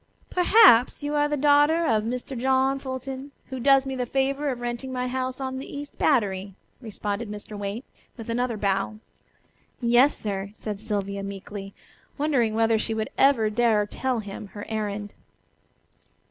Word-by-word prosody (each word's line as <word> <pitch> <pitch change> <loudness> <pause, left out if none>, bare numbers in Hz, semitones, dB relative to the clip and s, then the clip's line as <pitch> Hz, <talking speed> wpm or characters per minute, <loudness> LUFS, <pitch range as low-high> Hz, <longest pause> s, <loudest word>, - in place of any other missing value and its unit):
"Perhaps 360 - +6
you 290 +1 -2
are 295 0 +2
the 295 0 -1
daughter 295 +4 +4
of 220 -7 +2
Mr. 250 +3 -4
John 265 +2 +2
Fulton, 265 +1 -6 0.2
who 260 - -4
does 275 +1 +5
me 265 -1 -3
the 250 -1 -2
favor 275 +3 0
of 250 -2 -3
renting 240 +2 -4
my 250 0 -2
house 255 0 -3
on 260 -1 -3
the 270 - -8
East 290 0 -8
Battery," 195 -8 +1 0.3
responded 210 -1 -4
Mr. 210 0 -8
Waite, 205 +5 -5 0.3
with 225 - -8
another 235 0 -1
bow. 195 +1 0 0.8
"Yes, 245 +4 +4
sir," 200 -1 -4
said 210 -3 -5
Sylvia 200 -2 -3
meekly, 195 0 -7 0.4
wondering 265 -7 +1
whether 225 0 +3
she 225 +1 -2
would 220 0 -3
ever 235 -6 +4
dare 220 -2 +2
tell 250 +2 -2
him 205 0 -8
her 205 +1 -9
errand. 210 -2 -3
240 Hz, 160 wpm, -25 LUFS, 210-270 Hz, 0.8 s, Perhaps